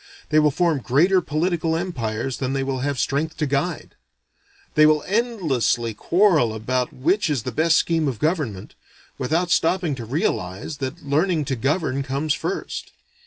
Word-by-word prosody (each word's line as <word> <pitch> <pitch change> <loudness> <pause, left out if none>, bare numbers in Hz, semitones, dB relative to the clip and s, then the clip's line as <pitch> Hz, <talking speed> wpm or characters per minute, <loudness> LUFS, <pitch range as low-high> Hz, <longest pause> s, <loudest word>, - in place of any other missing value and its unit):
They 155 +1 +4
will 150 -1 +4
form 165 0 +1
greater 170 +10 +3
political 165 +1 0
empires 130 -8 -3
than 130 0 -2
they 135 0 0
will 135 -1 -2
have 140 +1 -2
strength 150 +5 -1
to 155 - 0
guide. 145 +5 -2 0.8
They 155 -1 +6
will 155 -1 +3
endlessly 165 - 0
quarrel 160 - +2
about 125 +3 -1
which 170 +8 +1
is 135 -7 -1
the 125 - -3
best 160 +6 +3
scheme 165 -2 +1
of 130 -5 -2
government, 145 - -2 0.5
without 165 +7 0
stopping 175 -2 +2
to 120 -4 -6
realize 110 - -2
that 135 +1 -5
learning 155 +2 +1
to 135 - -1
govern 140 +2 0
comes 140 +3 -1
first. - - -4
150 Hz, 160 wpm, -22 LUFS, 130-165 Hz, 0.8 s, They